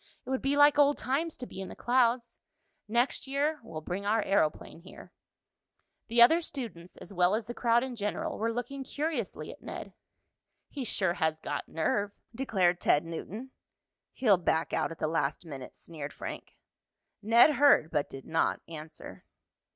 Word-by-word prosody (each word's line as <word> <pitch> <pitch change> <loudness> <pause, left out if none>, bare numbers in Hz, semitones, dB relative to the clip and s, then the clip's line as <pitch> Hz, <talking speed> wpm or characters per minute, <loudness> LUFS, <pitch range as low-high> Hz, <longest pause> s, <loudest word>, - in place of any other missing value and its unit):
"It - - -5
would 265 - 0
be 275 +1 +1
like 290 0 +6
old 290 0 +5
times 295 +5 -1
to 250 - -6
be 195 - -8
in 190 - -6
the - - -9
clouds. 240 -1 +1 0.5
Next 240 +5 0
year 290 +3 0
we'll 195 -9 -8
bring 180 +5 -4
our 215 +1 +2
aeroplane 165 -4 0
here." 185 +3 -14 0.9
The 235 +1 +6
other 325 +8 +5
students, 225 - -6
as 195 - -11
well 180 +2 +3
as 220 0 -3
the 240 - -6
crowd 235 0 +2
in 260 -2 -5
general, 235 +9 -3
were 225 +2 0
looking 245 +4 -4
curiously 285 - -3
at - - -14
Ned. - - -7 0.8
"He 280 - -5
sure 190 -5 +1
has 160 -4 0
got - - -4
nerve," 200 +5 0 0.2
declared 190 -8 +1
Ted 150 +2 +3
Newton. 205 +10 -7 0.6
"He'll 215 -7 +3
back 165 -2 0
out - - +1
at 165 - -8
the 155 - -1
last 155 0 -1
minute," 135 -5 -8
sneered 150 -4 -8
Frank. - - -8 0.7
Ned 230 +7 +6
heard 280 - +5
but 145 - 0
did 135 -1 -9
not 160 0 +1
answer. 155 -1 -10
220 Hz, 170 wpm, -30 LUFS, 170-260 Hz, 0.9 s, like